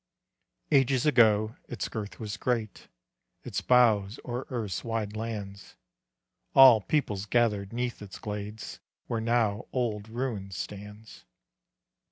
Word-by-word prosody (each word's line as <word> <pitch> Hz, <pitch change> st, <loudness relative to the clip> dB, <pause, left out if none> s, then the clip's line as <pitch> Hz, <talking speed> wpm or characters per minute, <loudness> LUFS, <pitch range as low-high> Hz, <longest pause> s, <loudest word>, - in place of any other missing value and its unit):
Ages 135 Hz, -1 st, +3 dB
ago 110 Hz, -5 st, +4 dB
its 120 Hz, -, -3 dB
girth 105 Hz, -2 st, -6 dB
was 105 Hz, -3 st, -4 dB
great; 115 Hz, -5 st, -2 dB, 0.6 s
Its -, -, -3 dB
boughs 115 Hz, -4 st, +3 dB
o'er 125 Hz, +1 st, -4 dB
earth's 110 Hz, -8 st, -3 dB
wide 115 Hz, -2 st, -3 dB
lands; 105 Hz, -3 st, -6 dB, 0.8 s
All 130 Hz, -5 st, +9 dB
peoples 105 Hz, -6 st, -1 dB
gathered 105 Hz, -4 st, +1 dB
'neath 120 Hz, 0 st, -3 dB
its 100 Hz, -2 st, -9 dB
glades 105 Hz, +1 st, -6 dB, 0.3 s
Where 115 Hz, -2 st, -2 dB
now 115 Hz, -3 st, 0 dB
old 110 Hz, -4 st, -2 dB
ruin 115 Hz, -5 st, -3 dB
stands. 105 Hz, +3 st, -8 dB
110 Hz, 115 wpm, -28 LUFS, 105-120 Hz, 0.8 s, All